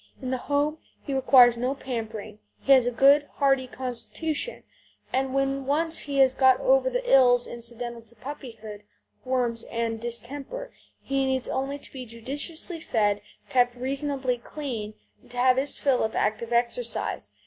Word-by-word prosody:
In 255 Hz, -1 st, -4 dB
the 260 Hz, -, 0 dB
home 295 Hz, +2 st, +1 dB, 0.2 s
he 280 Hz, -, -4 dB
requires 250 Hz, -3 st, +6 dB
no 250 Hz, +3 st, -1 dB
pampering; 220 Hz, -5 st, -6 dB, 0.2 s
he 275 Hz, -, 0 dB
has 260 Hz, -3 st, +7 dB
a -, -, +1 dB
good, 280 Hz, +5 st, +5 dB
hardy 270 Hz, -2 st, +2 dB
constitution, 265 Hz, -, -4 dB, 0.5 s
and 265 Hz, 0 st, +1 dB
when 275 Hz, 0 st, 0 dB
once 320 Hz, +3 st, +2 dB
he 280 Hz, -1 st, -3 dB
has 265 Hz, -1 st, +5 dB
got 260 Hz, -1 st, +5 dB
over -, -, +3 dB
the -, -, -3 dB
ills 245 Hz, -, +5 dB
incidental 235 Hz, 0 st, -5 dB
to 230 Hz, +1 st, -20 dB
puppyhood 225 Hz, -5 st, -8 dB, 0.4 s
worms 245 Hz, -3 st, 0 dB
and 230 Hz, -1 st, -3 dB
distemper 275 Hz, -, -6 dB, 0.3 s
he 275 Hz, 0 st, 0 dB
needs 260 Hz, -1 st, -1 dB
only 270 Hz, +2 st, -2 dB
to -, -, -15 dB
be 255 Hz, -2 st, -7 dB
judiciously 290 Hz, +9 st, -5 dB
fed, 205 Hz, -8 st, +1 dB, 0.3 s
kept 245 Hz, -1 st, +3 dB
reasonably 265 Hz, 0 st, -2 dB
clean, 235 Hz, -6 st, -6 dB, 0.3 s
and -, -, -22 dB
to 245 Hz, -, -10 dB
have 255 Hz, +1 st, +4 dB
his 275 Hz, +1 st, 0 dB
fill 270 Hz, -3 st, +2 dB
of 220 Hz, -, -1 dB
active 225 Hz, +2 st, -1 dB
exercise. 240 Hz, -, -1 dB
260 Hz, 160 wpm, -26 LUFS, 235-280 Hz, 0.5 s, has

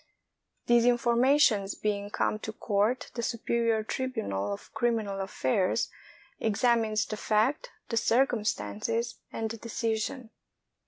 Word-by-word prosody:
These 240 Hz, 0 st, +4 dB
informations 240 Hz, -3 st, +3 dB
being 205 Hz, -1 st, -2 dB
come 215 Hz, -, 0 dB
to 220 Hz, -, -5 dB
court, 215 Hz, +3 st, 0 dB
the 235 Hz, -, -3 dB
superior 230 Hz, -1 st, 0 dB
tribunal 215 Hz, -, -2 dB
of 100 Hz, -, -7 dB
criminal 220 Hz, -5 st, 0 dB
affairs 185 Hz, -1 st, 0 dB, 0.5 s
examines 220 Hz, 0 st, +2 dB
the 215 Hz, -, -5 dB
fact, 230 Hz, -, +1 dB, 0.2 s
the 230 Hz, -, -1 dB
cir 240 Hz, +4 st, +4 dB
cumstances, 220 Hz, -, -2 dB
and 225 Hz, -1 st, -3 dB
the 230 Hz, -, -6 dB
decision. 230 Hz, +2 st, -3 dB
225 Hz, 115 wpm, -29 LUFS, 210-240 Hz, 0.5 s, These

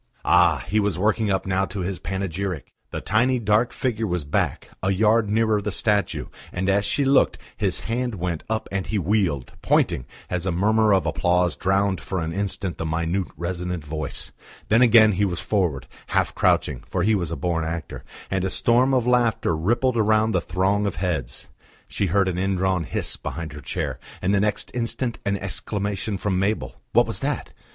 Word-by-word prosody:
Ah! 85 Hz, -6 st, +4 dB
he 105 Hz, +3 st, +2 dB
was 100 Hz, -4 st, 0 dB
working 110 Hz, +2 st, +1 dB
up 95 Hz, -1 st, 0 dB
now 95 Hz, 0 st, +1 dB
to 95 Hz, +1 st, -5 dB
his 90 Hz, +1 st, -3 dB
panegyric! 95 Hz, -5 st, -4 dB, 0.2 s
The -, -, -5 dB
tiny 120 Hz, +5 st, +2 dB
dark 110 Hz, +1 st, +2 dB
figure 115 Hz, -4 st, -1 dB
was 90 Hz, -5 st, -2 dB
back, 75 Hz, -, -1 dB
a 95 Hz, -, 0 dB
yard 105 Hz, +2 st, +3 dB
nearer 110 Hz, -1 st, +2 dB
the 105 Hz, +1 st, -3 dB
statue, 105 Hz, 0 st, 0 dB, 0.3 s
and 95 Hz, +1 st, -2 dB
as 100 Hz, +1 st, +2 dB
she 140 Hz, +7 st, +1 dB
looked, 135 Hz, +1 st, +4 dB, 0.2 s
his -, -, -1 dB
hand 120 Hz, 0 st, -2 dB
went 85 Hz, -3 st, -3 dB
up 110 Hz, 0 st, -1 dB
and 95 Hz, -1 st, -2 dB
he 110 Hz, -, -1 dB
wheeled, 95 Hz, -, 0 dB
pointing, 65 Hz, -, +1 dB, 0.2 s
as 90 Hz, +1 st, -2 dB
a -, -, +1 dB
murmur 110 Hz, +5 st, +3 dB
of 95 Hz, -2 st, +3 dB
applause 90 Hz, -1 st, +1 dB
drowned 95 Hz, 0 st, +1 dB
for 95 Hz, -, -3 dB
an 80 Hz, 0 st, -3 dB
instant 100 Hz, -1 st, -3 dB
the -, -, -1 dB
minute, 85 Hz, +3 st, -1 dB
resonant 90 Hz, -1 st, -3 dB
voice. 75 Hz, -1 st, -5 dB, 0.4 s
Then 110 Hz, +3 st, +5 dB
again 115 Hz, -3 st, +7 dB
he 100 Hz, +1 st, 0 dB
was 90 Hz, -4 st, 0 dB
forward, 90 Hz, -10 st, 0 dB, 0.2 s
half -, -, +1 dB
crouching -, -, +1 dB
for -, -, -1 dB
he 110 Hz, -, +3 dB
was 90 Hz, -6 st, 0 dB
a 85 Hz, -, -3 dB
born 85 Hz, -2 st, -1 dB
actor 80 Hz, +1 st, -5 dB, 0.3 s
and 95 Hz, -1 st, 0 dB
a 95 Hz, -, 0 dB
storm 125 Hz, +6 st, +3 dB
of 125 Hz, -3 st, +2 dB
laughter 120 Hz, -8 st, +2 dB
rippled 120 Hz, +9 st, +1 dB
round 110 Hz, 0 st, +3 dB
the 90 Hz, -, +2 dB
throng 95 Hz, +5 st, +1 dB
of 100 Hz, -, -3 dB
heads. 75 Hz, -9 st, -3 dB, 0.4 s
She 100 Hz, -, -1 dB
heard 100 Hz, +2 st, +2 dB
an 90 Hz, -1 st, -1 dB
indrawn 95 Hz, -2 st, 0 dB
hiss -, -, -2 dB
behind 80 Hz, -3 st, -5 dB
her 75 Hz, -, -8 dB
chair, -, -, -3 dB, 0.2 s
and 95 Hz, +2 st, 0 dB
the 100 Hz, -, +3 dB
next 105 Hz, +1 st, -1 dB
instant 120 Hz, 0 st, -2 dB
an 100 Hz, 0 st, +1 dB
exclamation 100 Hz, +1 st, -3 dB
from 95 Hz, -1 st, -1 dB
Mabel.... 95 Hz, -, -2 dB
What -, -, +5 dB
was -, -, -3 dB
that? -, -, -2 dB
95 Hz, 190 wpm, -24 LUFS, 90-110 Hz, 0.4 s, again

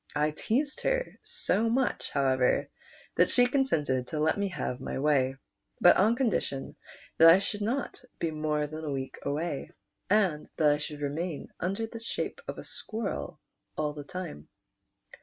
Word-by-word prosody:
I 150 Hz, +1 st, +2 dB
teased 275 Hz, -, -1 dB
her -, -, -1 dB
so 225 Hz, +2 st, +1 dB
much, 255 Hz, +2 st, 0 dB
however, 130 Hz, -2 st, +2 dB, 0.5 s
that -, -, +5 dB
she 245 Hz, -, +5 dB
consented 155 Hz, -, +1 dB
to 155 Hz, -, -3 dB
let 155 Hz, +1 st, +3 dB
me 200 Hz, 0 st, 0 dB
have 130 Hz, -8 st, -4 dB
my -, -, -4 dB
way, 135 Hz, -2 st, +2 dB, 0.4 s
but 175 Hz, -, +7 dB
on 215 Hz, +5 st, +4 dB
condition 220 Hz, -, -1 dB, 0.4 s
that 165 Hz, +1 st, +10 dB
I 165 Hz, -, +9 dB
should 205 Hz, +1 st, -3 dB
not 245 Hz, +6 st, -2 dB, 0.2 s
be 165 Hz, -, -1 dB
more 155 Hz, -1 st, 0 dB
than 155 Hz, +2 st, -7 dB
a 155 Hz, -, -3 dB
week 135 Hz, -1 st, -4 dB
awa\, 150 Hz, 0 st, -2 dB, 0.4 s
and 190 Hz, -7 st, +2 dB
that 150 Hz, -2 st, +5 dB
I 145 Hz, -, +1 dB
should 150 Hz, 0 st, -6 dB
remain 150 Hz, +2 st, -3 dB
under 195 Hz, +6 st, -1 dB
the 230 Hz, +1 st, -8 dB
shape 230 Hz, -, -4 dB
of -, -, -5 dB
a -, -, -7 dB
squirrel 215 Hz, -8 st, -5 dB, 0.4 s
all 150 Hz, -1 st, 0 dB
the 145 Hz, -1 st, -7 dB
time. 165 Hz, -, -7 dB
160 Hz, 165 wpm, -29 LUFS, 145-215 Hz, 0.5 s, that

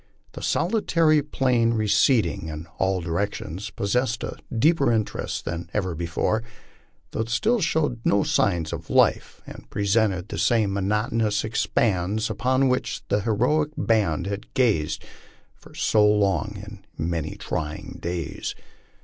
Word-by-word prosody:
The -, -, -9 dB
solitary 165 Hz, -8 st, +2 dB
plain 125 Hz, -5 st, +1 dB
receding 105 Hz, -, +2 dB
in 80 Hz, +1 st, -6 dB
all 95 Hz, -1 st, +1 dB
directions 90 Hz, +2 st, -3 dB
possessed 115 Hz, +4 st, -1 dB
a -, -, -4 dB, 0.2 s
deeper 140 Hz, +2 st, +3 dB
interest 110 Hz, -2 st, -2 dB
than 85 Hz, +1 st, -4 dB
ever 95 Hz, -4 st, 0 dB
before, 85 Hz, +6 st, -1 dB, 0.7 s
though -, -, -5 dB
it 110 Hz, +1 st, -1 dB
still 215 Hz, -, +2 dB
showed 155 Hz, -7 st, 0 dB
no 100 Hz, -, +3 dB
signs 85 Hz, -6 st, +1 dB
of -, -, -7 dB
life -, -, +2 dB
and -, -, -11 dB
presented 100 Hz, -2 st, +1 dB
the -, -, -4 dB
same 110 Hz, -5 st, +2 dB
monotonous 105 Hz, +2 st, 0 dB
expanse 110 Hz, -1 st, 0 dB
upon 130 Hz, +6 st, +2 dB
which 125 Hz, 0 st, -1 dB
the 105 Hz, -, +2 dB
heroic 125 Hz, +9 st, +1 dB
band 100 Hz, -8 st, +1 dB
had 100 Hz, +1 st, -5 dB
gazed 105 Hz, -13 st, +1 dB, 0.5 s
for -, -, -18 dB
so 105 Hz, -1 st, +3 dB, 0.5 s
many 80 Hz, -1 st, -2 dB
trying 75 Hz, -1 st, -5 dB
days. 85 Hz, -2 st, -4 dB
105 Hz, 125 wpm, -24 LUFS, 90-120 Hz, 0.7 s, deeper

